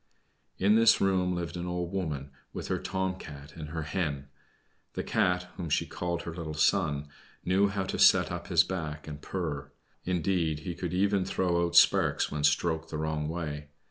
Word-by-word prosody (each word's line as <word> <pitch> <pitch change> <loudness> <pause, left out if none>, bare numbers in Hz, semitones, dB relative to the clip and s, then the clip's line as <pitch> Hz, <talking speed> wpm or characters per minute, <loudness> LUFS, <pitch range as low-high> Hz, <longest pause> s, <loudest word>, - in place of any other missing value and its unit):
In 100 +2 +4
this 115 +1 +6
room 90 -2 +2
lived 85 -1 -4
an 90 0 -4
old 90 -1 -3
woman, 75 -8 -3 0.2
with - - -6
her - - 0
Tom 95 0 -2
cat 75 0 -10
and 75 -3 -7
her 80 0 -4
Hen. 75 -5 -3 0.6
The - - -3
Cat, 90 0 +1
whom 85 -3 -4
she - - +1
called 85 -1 -3
her 85 - -5
little 80 -2 -5
son, 75 -3 +2 0.4
knew 95 +3 +3
how 100 -1 -2
to 95 - -4
set - - +6
up - - -5
his - - +5
back 80 -5 -5
and 75 -1 -7
purr; 80 -6 -4 0.3
indeed, 85 -3 0
he 85 - -4
could 90 +1 -4
even 100 0 +2
throw 90 -2 0
out 85 - -6
sparks 85 - +5
when 75 0 -3
stroked 80 +2 +1
the 75 - -4
wrong 80 -1 -2
way. 75 -3 -4
85 Hz, 185 wpm, -29 LUFS, 75-90 Hz, 0.6 s, this